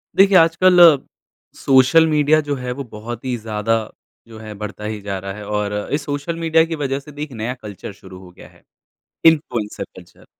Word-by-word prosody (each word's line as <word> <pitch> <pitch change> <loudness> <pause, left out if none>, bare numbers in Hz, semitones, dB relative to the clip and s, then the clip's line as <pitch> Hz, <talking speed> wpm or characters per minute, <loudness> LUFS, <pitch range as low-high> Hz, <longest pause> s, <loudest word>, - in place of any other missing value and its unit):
देखिए, 195 0 +5
आजकल 175 +2 +4
अ, 165 -5 +8 0.6
social 135 +5 +4
media 150 0 +3
जो 145 -1 -3
है 125 -2 -5
वो 140 +3 -5
बहुत 115 0 -8
ही 125 -1 -1
ज़्यादा 110 0 -1 0.5
जो 115 -1 -12
है 110 -1 -9
बढ़ता 105 0 -8
ही 105 0 -4
जा 100 -1 -4
रहा 95 +1 -6
है 105 +1 -9
और 105 -1 -2 0.2
इस 145 0 -1
सोशल 145 +3 -4
मीडिया 165 -1 +3
की 165 0 -4
वज़ह 140 -2 -2
से 140 +2 -14
भी 145 +1 -6
एक 150 - -8
नया 115 +1 -4
कल्चर 105 -5 -9
शुरू 95 -2 -14
हो 90 -1 -14
गया 90 - -15
है। - - -24 0.6
Influencer 125 -10 +1
culture - - -16
130 Hz, 200 wpm, -19 LUFS, 105-155 Hz, 0.6 s, अ